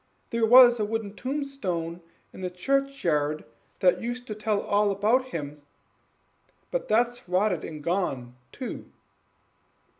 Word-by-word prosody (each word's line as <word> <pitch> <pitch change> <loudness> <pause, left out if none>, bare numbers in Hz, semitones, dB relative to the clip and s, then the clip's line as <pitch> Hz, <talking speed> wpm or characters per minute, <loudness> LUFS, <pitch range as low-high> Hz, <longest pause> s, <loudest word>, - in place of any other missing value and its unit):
There 230 -1 +2
was 245 0 +8
a - - +1
wooden 215 -1 -3
tombstone 210 - -3 0.3
in - - -10
the 180 - -2
churchyard 180 - 0 0.4
that 180 -1 +4
used 245 +1 -4
to 220 - -5
tell 210 0 -1
all 205 +1 +2
about 215 +6 +2
him, 150 - -6 1.1
but - - -2
that's 240 0 +1
rotten 185 -2 +1
and 155 -2 -8
gone 140 -9 -2 0.2
too." 255 - -7
210 Hz, 125 wpm, -27 LUFS, 175-245 Hz, 1.1 s, was